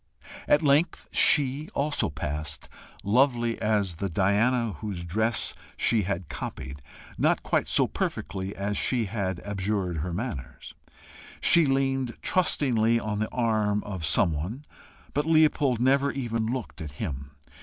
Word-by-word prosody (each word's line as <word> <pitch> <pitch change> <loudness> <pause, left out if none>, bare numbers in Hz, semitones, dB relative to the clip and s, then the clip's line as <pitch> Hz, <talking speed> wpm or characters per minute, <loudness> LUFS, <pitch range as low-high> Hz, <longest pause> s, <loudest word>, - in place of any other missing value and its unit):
At 145 - +4
length 145 +4 +2
SHE 145 +1 +4
also 145 +1 0
passed 75 +2 -4 0.4
lovely 120 +2 +2
as 105 -5 0
the 100 +2 -2
Diana 105 +6 +2
whose 100 -5 -5
dress 110 +7 0 0.2
she 115 - +2
had 95 -3 -3
copied 70 0 -6 0.4
not - - +2
quite - - 0
so - - +3
perfectly 95 0 -4
as 100 +1 -2
she 120 -3 +1
had 95 -3 -3
abjured 95 -3 -2
her 85 +4 -3
manners. 95 - -6 0.7
She 170 -3 +5
leaned 135 -2 0
trustingly 120 -10 +2
on 105 -2 -3
the 110 - -1
arm 110 -4 +1
of 95 -5 -6
some 80 +2 +3
one, 100 - -5 0.5
but 145 +2 0
Leopold 150 -6 +3
never 135 +3 +3
even 115 -4 -2
looked 125 -6 -4
at 75 -3 -7
him. 70 -5 -5
110 Hz, 135 wpm, -27 LUFS, 95-130 Hz, 0.7 s, She